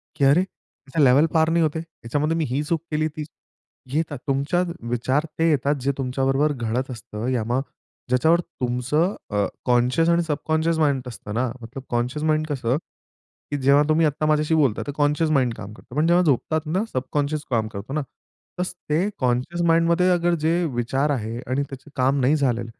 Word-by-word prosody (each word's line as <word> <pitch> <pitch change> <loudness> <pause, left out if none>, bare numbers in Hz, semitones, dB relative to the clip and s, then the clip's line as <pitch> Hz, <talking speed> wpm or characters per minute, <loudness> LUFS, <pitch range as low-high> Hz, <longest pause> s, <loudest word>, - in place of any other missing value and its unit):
की 140 - +2
"अरे 140 +6 +5
त्याच्या 150 -5 -6
लेव्हल 135 +4 +6
पार 160 0 +3
नाही 170 0 +3
होते. 155 +1 0
त्याच्यामध्ये 155 0 -2
मी 160 - +1
ही 135 +3 0
चूक 160 +1 -1
केली, 155 0 +1
ती" 155 0 -6 0.7
येतात 155 -2 -1
तुमच्या 140 +6 +1 0.3
विचार 130 +5 0
ते 165 0 +4
येतात 145 0 +2
जे 140 - +1
तुमच्याबरोबर 135 +2 +1
घडत 125 +1 -2
असतं 110 -1 -6
या 125 -4 0
मग 125 +3 +1 0.5
ज्याच्यावर 160 +7 +4 0.2
तुमचं 125 - +1 0.2
अ, 105 -1 +1 0.2
कॉन्शियस 125 +6 +3
आणि 170 0 +3
सबकॉन्शियस 160 +1 0
माइंड 140 -4 +2
असतं 105 -3 -7
ना. 125 +3 +1
मतलब 125 +4 -8
कॉन्शियस 125 +5 -1
माइंड 155 0 +1
कसं? 130 -3 0 0.7
की 145 - 0
जेव्हा 140 +2 +5
तुम्ही 160 +1 +4
आत्ता 150 +1 0
माझ्याशी 155 +1 +2
बोलताय 140 -8 +2
तर - - -2
कॉन्शियस 150 +2 +2
माइंड 130 -5 +2
काम 105 +1 -8
करतो. 120 - -14
पण 155 +2 +2
जेव्हा 175 +1 +4
झोपतात 155 +1 +1
ना 180 +7 0
सबकॉन्शियस 145 +3 -1
काम 115 -3 +1
करतो 110 +5 -7
ना. 155 - 0 0.6
तसं 180 0 -2 0.2
ते 165 +7 +2
कॉन्शियस 130 +7 0
माइंडमध्ये 170 +2 +3
अगर 175 0 +2
जे 165 - +3 0.2
विचार 130 +5 0
आहे 115 -3 -3
आणि 130 +3 0
त्याचे 135 +2 -10
काम 135 +1 +2
नाही 135 +4 +4
झालं 125 -5 0
145 Hz, 180 wpm, -23 LUFS, 125-160 Hz, 0.7 s, लेव्हल